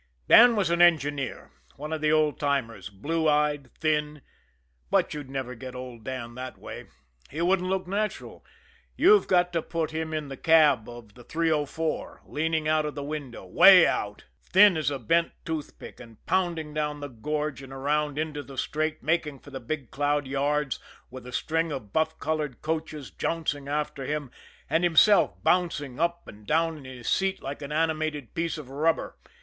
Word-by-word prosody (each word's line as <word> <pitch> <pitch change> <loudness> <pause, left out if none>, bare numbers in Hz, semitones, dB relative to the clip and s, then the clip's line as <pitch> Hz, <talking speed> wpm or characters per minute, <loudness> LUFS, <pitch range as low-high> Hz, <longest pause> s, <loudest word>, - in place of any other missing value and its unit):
Dan 240 0 +8
was 190 -5 +1
an 170 0 +2
engineer, 145 -5 +2 0.2
one 150 +2 -6
of 155 - -3
the 155 0 +2
old 155 -1 +2
timers, 115 -9 -2
blue 155 +11 -1
eyed, 150 -2 +1
thin 150 -2 -1 0.7
but - - +2
you'd 145 -3 -7
never 135 -2 -4
get 125 +1 -9
old 125 -3 -8
Dan 120 -2 -5
that 130 +1 -7
way, - - -9 0.4
he 150 - -7
wouldn't 180 +1 +1
look 190 0 -1
natural! 205 +3 -4 0.5
You've 410 +3 +5
got 180 -1 +2
to 165 - +1
put 160 0 -3
him 160 0 -3
in 155 -2 -3
the 135 -1 -8
cab 150 -8 +4
of 120 -3 -11
the 120 - -15
304, 160 +1 -2
leaning 160 0 -1
out 155 0 +2
of 150 - -6
the 145 - -4
window, 140 -8 -6
way 90 - +8
out, - - -2 0.2
thin 200 0 +6
as 155 -4 0
a 140 - -3
bent 165 +8 +1
toothpick, 160 -3 -6
and 115 -3 -15
pounding 170 -5 -1
down 150 -1 -2
the 145 - -5
gorge 150 +3 -3
and 135 -1 -11
around 145 +2 -1
into 155 -1 -3
the 140 -2 -12
straight 155 +3 -2
making 155 -2 0
for 145 - -15
the 135 - -6
Big 130 +1 -5
Cloud 145 0 0
yards, 145 +1 -1 0.3
with 130 -1 -10
a - - -8
string 165 +5 -1
of 120 -8 -7
buff 160 0 0
colored 150 -4 -3
coaches 155 -3 -4
jouncing 150 -4 -2
after 150 -1 -2
him, 145 -2 -3 0.4
and 165 +2 +1
himself 175 +5 +5
bouncing 150 -8 0
up 170 +1 -1
and 105 0 -13
down 160 0 +1
in 135 - -13
his 130 -2 -9
seat 190 0 +1
like 140 +2 -6
an 140 0 -7
animated 155 -3 -1
piece 165 0 -2
of 150 -4 -8
rubber. 160 +4 0
150 Hz, 180 wpm, -27 LUFS, 135-160 Hz, 0.7 s, Dan